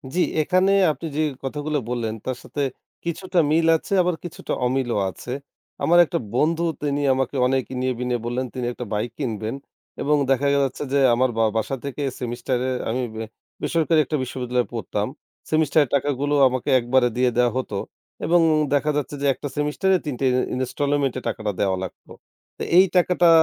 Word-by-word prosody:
জি, - - +1 0.2
এখানে 185 +5 +3 0.2
আপনি 160 - -7
যেই 155 0 +1
কথাগুলো 150 +2 -2
বললেন 120 -3 -2
তার 130 -1 -2
সাথে 145 - -4 0.4
কিছুটা 180 +2 -1
মিল 165 +1 +3
আছে, 180 - -6
আবার 180 -1 +1
কিছুটা 175 - -5
অমিলও 125 -3 0
আছে। 120 - -8 0.5
আমার 175 +1 +5
একটা - - -2 0.2
বন্ধু 165 +5 +2 0.2
তিনি 145 0 0
আমাকে 135 +1 -1
অনেক 130 -1 +1
ইনিয়ে-বিনিয়ে 125 -1 -1
বললেন 125 +2 -1
তিনি 125 -2 -3
একটা 125 - -6
বাইক 105 +2 -1
কিনবেন। 110 -3 -3 0.5
এবং 150 +1 +3 0.2
দেখা 135 +2 +2
গেছে 140 0 0
যে 140 - +4 0.2
আমার 130 +2 +2
বা 115 - +3
বাসা 110 +5 -1
থেকে 140 +1 -4 0.2
সেমিস্টারে 125 +1 -2 0.2
আমি 125 +3 -1 0.6
বেসরকারি 165 -1 +2
একটা 155 - -1
বিশ্ববিদ্যালয়ে 125 -1 -2
পড়তাম। 105 -2 -2 0.4
সেমিস্টারের 155 -2 +3
টাকাগুলো 145 +1 0
আমাকে 130 +2 -2
একবারে 125 +1 +3
দিয়ে 125 0 +3
দেওয়া 125 -1 +4
হতো 120 -6 -3 0.5
এবং 175 +1 +4 0.3
দেখা 145 +1 +2
যাচ্ছে 145 0 -3
যে - - 0
একটা 145 - -6
সেমিস্টারে 150 +6 +2
৩ 145 -4 -2
টে 135 - 0
ইন - - +1 0.2
ইনস্টলোমেন্টে 140 +1 0
টাকাটা 110 -2 -2
দেওয়া 95 -2 +1
লাগতো। 95 - -9 0.5
তো - - -4
এই 185 - +8
টাকাটা 180 -1 +4
135 Hz, 165 wpm, -23 LUFS, 125-150 Hz, 0.6 s, এই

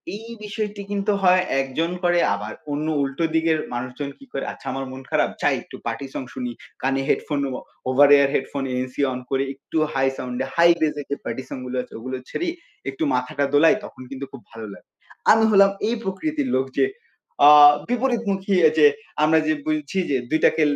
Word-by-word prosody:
এই 225 +2 -9
বিষয়টি 210 -1 -4
কিন্তু 205 +1 0
হয় 185 0 +5 0.2
একজন 145 +6 -2
করে 175 0 +3 0.2
আবার 105 +1 -6 0.2
অন্য 150 +2 -2
উল্টো 135 +3 -2
দিকের 160 0 +2 0.2
মানুষজন 130 +3 -4
কী 275 - -14
করে? - - -3
আচ্ছা - - -14
আমার 135 0 -4
মন 130 0 -8
খারাপ - - +2
যাই - - +3
একটু - - -12
পার্টি 140 - -4
সং - - -4
শুনি। 125 -1 -4 0.3
কানে 135 +1 0
headphone 145 -3 0
O - - -6 0.4
over 140 +2 +6
air 140 -1 +4
headphone 135 +1 -2
NC 130 +2 -3
on 125 - -4
করে 135 0 +1
একটু 140 +3 -6 0.2
হাই 135 0 +2
সাউন্ড 125 -1 -5
এ - - -8
হাই 170 0 +6
বেস 155 -1 +2
এ - - -8
যে - - +1
পার্টি 130 - -4
সং - - -5
গুলো 125 0 -4
আছে - - -17
ওগুলো 130 +3 -5
ছেড়েই 345 -1 -2 0.4
একটু 135 +4 -4
মাথাটা 125 +3 -1
দোলাই 160 +7 +6
তখন - - -12
কিন্তু 135 0 -5
খুব 135 - -10
ভালো 115 -1 -8
লাগে। - - -16 0.4
আমি 225 0 +5
হলাম 200 -1 +6 0.2
এই 235 - 0
প্রকৃতির 285 +9 -2
লোক 130 - 0
যে - - +5 0.6
আ - - +11 0.4
বিপরীতমুখী 225 -6 0 0.2
যে 150 - +7 0.4
আমরা 160 +1 +5
যে 155 - +3
বলছি 155 +3 -2
যে 135 - +3
২ 155 - +1
টাকে - - +3
145 Hz, 195 wpm, -22 LUFS, 130-195 Hz, 0.6 s, আ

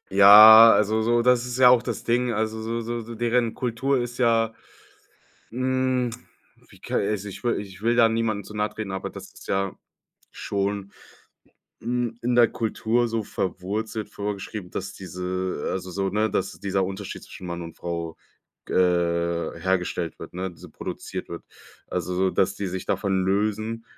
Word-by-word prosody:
Ja, 110 +3 +10
also, 110 +1 +2
so 120 +1 +2
das 125 0 +3
ist 125 +1 -4
ja 125 - +8
auch 125 -1 +5
das 120 -4 -5
Ding, 120 +1 +1
also, 110 0 -2
so 115 +1 -3
so 120 +1 -4
so 115 +1 -8
deren 120 0 +1
Kultur 130 +3 -1
ist 120 0 -4
ja, 115 -2 +2 1.0
hm, 130 0 0 0.6
wie - - -18
ka - - -5
also, 105 0 -1
ich 100 - -10
will 120 -1 0
ich 95 -2 -10
will 115 +2 +2
da 115 -2 +6
niemandem 110 -2 -1
zu 105 - -12
nahe 105 0 0
treten, 105 -3 -6
aber 95 0 -4
das - - -11
ist - - -14
ja 95 0 -1 0.6
schon, 100 0 -3 0.9
hm, 120 -1 -2
in 120 0 0
der 120 -1 +6
Kultur 115 +1 0
so 115 -1 -2
verwurzelt 105 +4 -4
vorgeschrieben, 100 -2 -6
dass 95 - -5
diese 90 -2 -4
also, 95 -1 -4
so 95 +1 -1
ne, 105 +2 0
dass - - -2
dieser 95 -1 0
Unterschied 95 +1 -7
zwischen 95 - -11
Mann 85 0 -5
und 85 -1 -10
Frau, 85 -1 -5 0.5
g - - -7
äh, 85 -2 +1
hergestellt 90 -2 -1
wird - - -10
ne, 95 +1 -3
diese 85 - -14
produziert - - -6
wird. 85 - -7 0.4
Also, 90 - -3
so 95 +1 +1
dass 95 - +1
die 100 - -3
sich 90 +1 -5
davon 95 -2 0
lösen, 110 +3 -1
105 Hz, 175 wpm, -24 LUFS, 95-115 Hz, 1.0 s, Ja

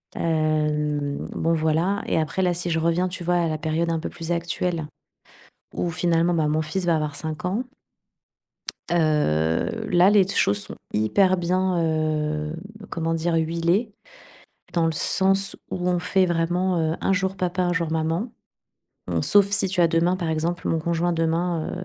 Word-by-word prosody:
Hem, 150 -2 0
bon 165 - 0
voilà 165 +5 +1
et - - +1
après 160 +4 -1
là, 180 -1 +2
si 175 +1 -3
je 165 -1 +1
reviens, 170 +3 +1
tu 180 0 -7
vois 175 +1 +2
à 170 -1 +1
la 155 - -2
période 160 +2 -1
un 165 - 0
peu 160 - -4
plus 165 -1 -6
actuelle 170 -1 -2 0.9
où 175 - -1
finalement, 170 0 +1
bah, 155 -2 +1
mon 155 +1 +1
fils 170 +5 -3
va 170 -2 +3
avoir 150 -2 -2
5 155 +2 -5
ans 205 +8 -1 1.3
heu, 150 - +1
là, 180 +2 +6
les 205 -2 +5
t 195 - -4
choses 100 +1 +3
sont - - -3 0.2
hyper 185 - +3
bien, 180 +1 0
heu, 155 -1 -1 0.4
comment 165 -1 -2
dire, 165 +1 0
huilées. 170 +7 +1 0.8
Dans 170 -2 +2
le 165 - +2
sens 195 +4 +1 0.2
où 180 -1 -2
on 180 -1 +1
fait 185 +1 +2
vraiment, 175 +2 0
heu, 160 0 0
un 195 - +2
jour 190 0 -1
papa, 180 0 -1
un 175 0 +1
jour 165 -2 -1
maman. 165 +8 -1 0.8
Bon - - 0
sauf 205 -1 +5
si 200 -1 +3
tu 180 -1 0
as 170 - +5
demain 165 +2 +2
par 175 -3 -3
exemple, 165 +2 -2
mon 165 - +1
conjoint 170 +2 0
demain, 165 0 -1
170 Hz, 175 wpm, -24 LUFS, 160-180 Hz, 1.3 s, là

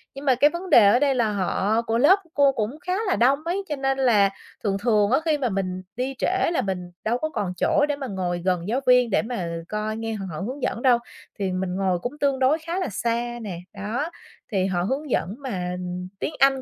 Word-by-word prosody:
nhưng 275 - -8
mà 260 -3 +4
cái 290 +4 +5
vấn 350 +3 -6
đề 225 - +8
ở 240 +5 +5
đây 280 -2 +2
là 225 -3 +1
họ 205 +3 0
của 230 -1 -1
lớp 300 +11 +6
cô 280 -1 +5
cũng 240 +5 -3
khá 365 +3 -3
là 375 - +2
đông 265 +4 +3
ấy, 370 +4 -1
cho 295 - -1
nên 270 -1 0
là 220 -7 +4 0.3
thường 195 -2 0
thường 210 -1 +2
á 265 - +4
khi 310 -2 +2
mà 255 -4 0
mình 185 -2 -2
đi 255 +2 -2
trễ 375 -1 +1
là 305 - +1
mình 180 -4 -4
đâu 235 +3 +1
có 310 +3 -2
còn 190 -10 -3
chỗ 290 +9 +3
để 290 - +1
mà 275 -2 -5
ngồi 180 -3 -2
gần 180 -1 0
giáo 245 +5 +1
viên 250 -2 +5
để - - +2
mà 225 -7 -4 0.2
coi 215 +1 -2
nghe 225 0 -3
h 210 - -5
họ 155 - -5
hướng 255 +7 -5
dẫn 235 - -1
đâu. 250 -3 +5 0.4
Thì 190 -2 -1
mình 185 0 -2
ngồi 185 -2 0
cũng 250 +9 -5
tương 275 -2 +1
đối 265 +4 +4
khá 335 +4 -3
là 370 - -1
xa 235 +3 -2
nè, 190 -6 -5
đó, 225 - -3 0.4
thì 190 -2 +1
họ 180 -2 0
hướng 270 +7 -2
dẫn 195 -2 -1
mà 180 -9 -3 0.4
tiếng 310 - -2
Anh 270 -1 +4
235 Hz, 240 wpm, -24 LUFS, 195-275 Hz, 0.4 s, đề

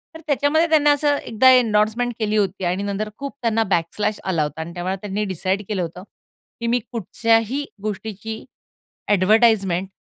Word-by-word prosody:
तर - - -8
त्याच्यामध्ये 290 +3 +2
त्यांनी 300 -2 +4
असं 290 0 +3
एकदा 240 +1 +3
एंडोर्समेंट 235 0 +2
केली 215 -1 0
होती 195 -2 -1
आणि 180 +3 -1
नंतर 205 +1 -3
खूप 280 0 -6
त्यांना 225 -1 +1
बॅक 170 -2 +3
स्लॅश 210 0 -1
आला 170 -5 0
होता 150 +2 -5
आणि 170 +1 -7
त्यामुळे 180 +2 -3
त्यांनी 205 0 -2
डिसाईड 190 +1 -2
केलं 200 -4 -1
होतं 175 +1 -6 0.6
की 235 - -1
मी 240 +1 +2
कुठच्याही 230 +4 0 0.2
गोष्टीची 215 +1 -5 0.7
एडव्हर्टाइजमेंट 195 -2 +3
215 Hz, 160 wpm, -21 LUFS, 190-235 Hz, 0.7 s, त्यांनी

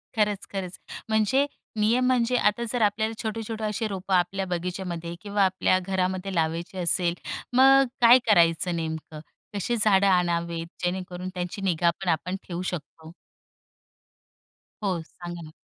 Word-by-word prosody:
खरंच, 210 -2 +1
खरंच. 185 -1 -4 0.3
म्हणजे 220 +6 +3 0.3
नियम 235 +4 +3
म्हणजे 250 -1 +2
आता 210 +2 +2
जर 245 - 0
आपल्याला 220 +2 +1
छोटे-छोटे 220 0 -4
अशी 215 +1 -1
रोपं 190 -1 -4
आपल्या 185 +2 +1
बगीच्यामध्ये 175 -1 -4
किंवा 205 -1 +1
आपल्या 185 0 +2
घरामध्ये 185 0 -2
लावायची 165 +3 -1
असेल. 175 0 +1 0.4
मग 270 +2 +7
अ, 275 - +3 0.2
काय 240 +2 +8
करायचं 170 -2 +4
नेमकं? 160 -1 -5 0.3
कशी 205 +4 -1
झाडं 200 -2 +4
आणावेत 170 -2 +1 0.2
जेणेकरून 180 0 -3
त्यांची 180 +3 -4
निगा 175 -2 +2
पण 190 - -1
आपण 175 +3 0
ठेवू 175 0 -4
शकतो? 160 -2 -6 1.7
हो, 185 -4 0
सांगा 175 -1 -9
ना. 155 - -10
185 Hz, 140 wpm, -26 LUFS, 175-210 Hz, 1.7 s, काय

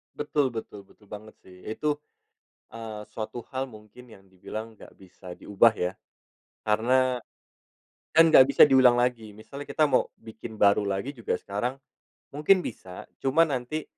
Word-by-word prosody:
Betul 145 -2 -1
betul 110 -3 -8
betul 105 +1 -24
banget 105 +2 -11
sih. 90 -1 -17
Itu, 150 +7 -2 0.8
eee, 110 -2 -7
suatu 115 +2 -7
hal 130 - 0
mungkin 110 +2 -15
yang 95 -3 -16
dibilang 110 +4 -8
nggak - - -15
bisa 90 -1 -13
diubah 105 +3 +4
ya. 90 -2 -2 0.8
Karena, 125 +4 +2 0.9
kan 165 - +6
nggak 135 -5 +7
bisa 140 - +5
diulang 130 -3 +5
lagi. 120 -3 -1
Misalnya, 110 +7 -10
kita 155 - +2
mau 135 -3 +1
bikin 110 0 -11
baru 100 0 +4
lagi 100 +8 -3
juga 115 -4 -3
sekarang 120 +7 -4 0.5
mungkin 165 +6 +3
bisa. 90 -1 -8 0.2
Cuma 145 +5 +3
nanti 145 +1 -4
115 Hz, 145 wpm, -26 LUFS, 105-130 Hz, 0.9 s, nggak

